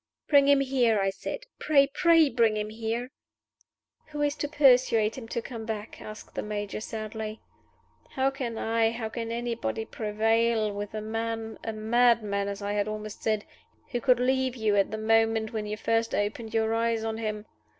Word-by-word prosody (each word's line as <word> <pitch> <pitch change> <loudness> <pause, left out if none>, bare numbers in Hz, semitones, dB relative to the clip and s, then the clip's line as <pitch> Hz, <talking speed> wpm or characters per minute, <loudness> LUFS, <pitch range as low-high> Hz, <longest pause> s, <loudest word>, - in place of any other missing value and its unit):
"Bring 280 -2 +5
him 280 -1 +5
here!" 250 -5 +2
I 195 0 +1
said. 460 - -6 0.2
"Pray, 280 -2 +5
pray 330 +2 +4
bring 230 -4 +2
him 210 0 -3
here!" 230 +3 -3 1.0
"Who 295 -1 -3
is 290 0 +1
to 290 - -2
persuade 250 -7 +4
him 250 -4 -8
to 230 0 -3
come 230 -4 -7
back?" 220 -1 -6
asked 215 0 -10
the - - -3
Major, 205 0 -4
sadly. 215 0 -5 0.7
"How 265 +1 +1
can 250 -4 -4
I, 225 0 +2
how 225 -1 -4
can 230 0 -4
anybody, 235 -1 -2
prevail 220 0 +1
with 205 +1 -5
a 215 - -3
man 225 0 -4
a 225 - -2
madman 215 -2 +2
I 205 0 -1
had 205 0 0
almost 215 0 -6
said! 215 -1 0 0.5
who 245 - -1
could 255 -1 +4
leave 260 0 +1
you 220 -3 +1
at 200 -1 +3
the 215 - -4
moment 225 0 +2
when 215 -1 -3
you 210 +1 -3
first 225 +1 0
opened 215 +2 -2
your 225 0 +1
eyes 230 -1 0
on 225 0 -3
him? 215 -1 -3
225 Hz, 180 wpm, -27 LUFS, 215-245 Hz, 1.0 s, Bring